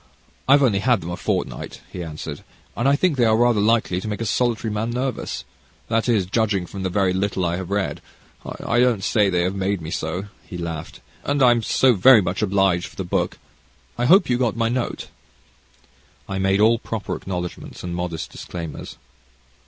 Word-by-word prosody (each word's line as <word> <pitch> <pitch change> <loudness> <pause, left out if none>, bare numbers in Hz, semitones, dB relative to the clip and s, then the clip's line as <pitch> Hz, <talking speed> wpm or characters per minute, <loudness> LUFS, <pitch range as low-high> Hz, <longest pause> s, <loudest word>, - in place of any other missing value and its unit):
I've 140 +1 +6
only 105 -7 +3
had 120 -1 +2
them 85 - -5
a - - -3
fortnight," - - -3
he 90 - -5
answered, 75 -2 -7 0.3
"and 120 +6 +2
I 140 - +4
think 165 -1 +1
they 120 - +4
are 110 -1 +4
rather 120 -3 +3
likely 105 -4 +2
to 110 - -6
make 105 -1 -3
a 115 - -2
solitary 115 -1 0
man 110 +2 -1
nervous 125 - -3 0.4
that 115 +2 +1
is, 105 -6 +2
judging 100 -2 0
from 95 +2 -8
the 95 - -1
very 95 0 +1
little 95 -1 -1
I 85 0 0
have 95 -1 -6
read 100 -1 -1 0.4
I 120 - -2
don't 120 -6 +3
say 105 -2 +3
that 90 - 0
they 85 - +2
have 90 +2 0
made 100 0 -1
me 80 0 -7
so," 90 +5 -3 0.2
he 90 - -8
laughed; 85 -2 -6 0.2
"and 145 -1 +1
I'm 120 -2 +5
so 125 +4 +3
very 115 +4 +7
much 90 0 -2
obliged 95 -3 +2
for - - -16
the 95 - -3
book. 90 - -1 0.6
I 120 - -1
hope 185 +10 +6
you 125 -1 +1
got 120 -3 0
my 115 0 +1
note?" 120 0 -3 1.2
I 95 -1 -3
made 95 +1 +2
all 115 +1 +5
proper 110 -2 -4
acknowledgments 90 -2 -6
and 90 -1 -4
modest 85 -2 -4
disclaimers. 85 -4 -7
100 Hz, 200 wpm, -22 LUFS, 90-120 Hz, 1.2 s, very